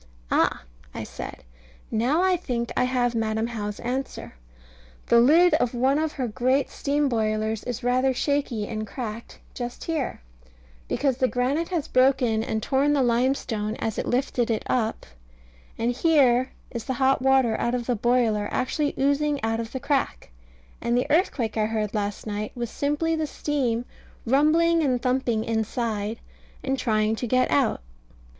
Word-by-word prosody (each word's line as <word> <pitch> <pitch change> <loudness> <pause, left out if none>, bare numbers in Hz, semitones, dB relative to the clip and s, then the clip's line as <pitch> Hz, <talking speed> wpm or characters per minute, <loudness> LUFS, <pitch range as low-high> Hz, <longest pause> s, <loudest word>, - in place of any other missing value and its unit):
"Ah," - - +2 0.3
I - - -4
said, - - -8 0.5
"now 255 +10 +2
I 375 -1 +4
think 240 -9 -3
I - - +2
have 250 -1 +1
Madam 220 -1 0
How's 210 -3 -4
answer. 260 +3 -4 0.7
The 235 - +5
lid 325 +9 +6
of 245 0 +1
one 265 +4 +2
of 315 -1 -1
her 255 -3 -2
great 255 +4 +1
steam 290 +1 0
boilers 220 -2 -1
is 245 0 -4
rather 255 +2 +2
shaky 255 -5 -1
and 215 -1 -4
cracked 230 -1 -6 0.2
just 245 -1 -6
here, 315 -6 -2 0.7
because 270 -4 0
the 260 - +2
granite 265 +7 0
has 345 -6 -2
broken 255 -4 +3
and 220 -1 -2
torn 280 +2 +2
the 280 -2 +3
limestone 235 -3 0
as 220 -2 -3
it - - -3
lifted 245 -1 0
it 220 -2 0
up; 225 -3 -1 0.7
and 230 +2 +1
here 255 -3 +3 0.2
is 235 -3 -5
the 260 - -1
hot 265 0 +2
water 265 -4 +3
out 240 +1 0
of 240 -1 -3
the 245 - 0
boiler 225 -2 +1
actually 290 +3 -1
oozing 285 +1 +1
out 225 0 0
of 230 -1 -5
the 260 - -4
crack; 275 - -1 0.5
and 235 +1 +1
the 250 - +1
earthquake 285 - +1
I 215 -1 +2
heard 215 -2 -2
last 205 -1 -3
night 210 0 -4
was 235 -2 -4
simply 295 +3 0
the 315 -1 -1
steam 255 -6 -1 0.4
rumbling 320 +6 +3
and 260 -5 +1
thumping 250 -3 0
inside, 220 -1 -2 0.4
and 270 0 0
trying 215 -1 +1
to 245 - -3
get 255 +2 +2
out." 270 - +2
245 Hz, 165 wpm, -25 LUFS, 225-275 Hz, 0.7 s, lid